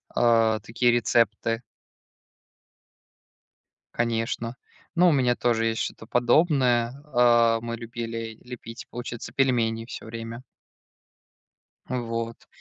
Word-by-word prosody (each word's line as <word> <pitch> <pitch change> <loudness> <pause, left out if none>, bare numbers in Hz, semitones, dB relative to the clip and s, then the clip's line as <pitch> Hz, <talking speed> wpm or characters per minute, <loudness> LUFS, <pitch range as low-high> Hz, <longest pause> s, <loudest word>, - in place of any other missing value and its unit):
А, 115 -2 +4
такие 115 +3 +1
рецепты. 115 -1 +1 2.3
Конечно, 115 0 -1 0.4
но 175 +1 +6
у - - +4
меня 125 -4 +3
тоже 115 -2 +1
есть 115 0 0
что-то - - -5
подобное, 120 -1 +3 0.2
а, 120 -2 +5
мы 115 0 -4
любили 115 -1 -6
лепить, 120 -1 -9
получается, 120 -1 -6
пельмени 115 -4 +1
всё - - -8
время. 115 +2 -7 1.5
Вот. 115 -2 -3
115 Hz, 95 wpm, -26 LUFS, 115-120 Hz, 2.3 s, но